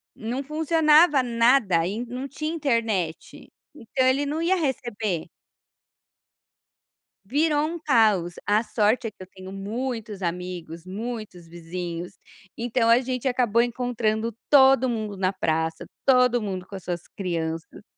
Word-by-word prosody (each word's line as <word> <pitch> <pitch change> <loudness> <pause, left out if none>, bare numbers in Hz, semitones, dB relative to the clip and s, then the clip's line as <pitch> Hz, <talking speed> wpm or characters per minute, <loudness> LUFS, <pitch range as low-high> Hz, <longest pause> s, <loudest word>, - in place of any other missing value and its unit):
Não 245 +5 -4
funcionava 310 0 +4
nada, 230 -7 +3
e 220 +6 -3
não 250 +3 -5
tinha 305 +3 -4
internet, 230 - -2 0.2
então 260 0 -1
ele 265 +2 +2
não 300 +3 -2
ia 350 +3 +2
receber. 230 - -2 2.0
Virou 295 +5 +1
um 340 +2 -5
caos, 215 - +2
a 210 +2 +3
sorte 220 +1 +1
é 215 - -5
que - - -57
eu 185 - -9
tenho 190 0 -11
muitos 215 +1 -4
amigos, 175 -1 -5
muitos 210 -2 -6
vizinhos, 175 +1 -6 0.4
então 235 0 +1
a 230 +1 +7
gente 255 0 -3
acabou 240 -3 +2
encontrando 235 -2 -1 0.2
todo 265 -2 +6
mundo 215 -4 -3
na 185 0 0
praça, 160 -2 -1 0.2
todo 250 -2 +4
mundo 190 -3 -4
com 195 - -10
as 190 - -8
suas 175 -1 -3 0.2
crianças. 165 -4 -4
230 Hz, 135 wpm, -25 LUFS, 185-260 Hz, 2.0 s, a